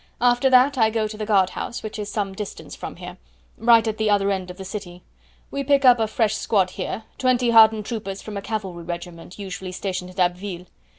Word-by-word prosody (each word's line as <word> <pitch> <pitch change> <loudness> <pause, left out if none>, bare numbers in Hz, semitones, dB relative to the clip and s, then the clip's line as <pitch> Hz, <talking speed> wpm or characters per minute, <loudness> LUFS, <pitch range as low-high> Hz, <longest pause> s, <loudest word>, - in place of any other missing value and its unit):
After 245 +2 +3
that 260 +1 +5
I 220 -1 +5
go 220 -1 0
to 215 - -8
the 215 0 -5
guard 195 -4 +3
house, 240 - -5
which 215 0 -6
is 205 -1 -5
some 200 -3 -2
distance 205 +1 -7
from - - -7
here, - - -9 0.4
right 230 0 +5
at 220 -1 -2
the 220 -1 +1
other 200 -1 +2
end 185 -2 -3
of 180 - -9
the 190 - -8
city. 180 -3 -7 0.5
We 280 - -2
pick 280 0 +3
up 245 -2 +7
a 220 - +1
fresh 215 -1 +1
squad 195 -4 +1
here, 195 +4 -5 0.2
twenty 250 -2 +2
hardened 220 -2 +6
troopers 205 -4 -5
from 210 +1 -8
a 200 - -3
cavalry 195 -5 -5
regiment 175 0 -7
usually 190 -2 -6
stationed 185 -1 -4
at 185 - -11
Abbeville. 180 0 -1
210 Hz, 220 wpm, -23 LUFS, 185-225 Hz, 0.5 s, up